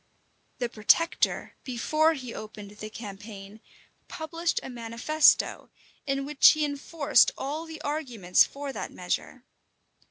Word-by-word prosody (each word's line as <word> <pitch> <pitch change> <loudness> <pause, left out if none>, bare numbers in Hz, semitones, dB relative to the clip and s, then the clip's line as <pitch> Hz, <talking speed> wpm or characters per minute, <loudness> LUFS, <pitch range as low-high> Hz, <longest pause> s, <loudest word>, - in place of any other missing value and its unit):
The 245 - -1
protector, 235 +9 +1
before 310 +6 +1
he 255 -4 -7
opened 210 -1 -9
the 215 +1 -8
campaign, 205 -1 -10 0.5
published 335 0 -2
a - - -6
manifesto, 240 +6 +2 0.4
in 275 0 -1
which 295 0 +6
he 310 -1 0
enforced 285 +1 +2
all 300 +5 -4
the 320 -1 -8
arguments 245 - +2
for 280 -1 -6
that - - -5
measure. - - -4
275 Hz, 120 wpm, -27 LUFS, 220-310 Hz, 0.5 s, which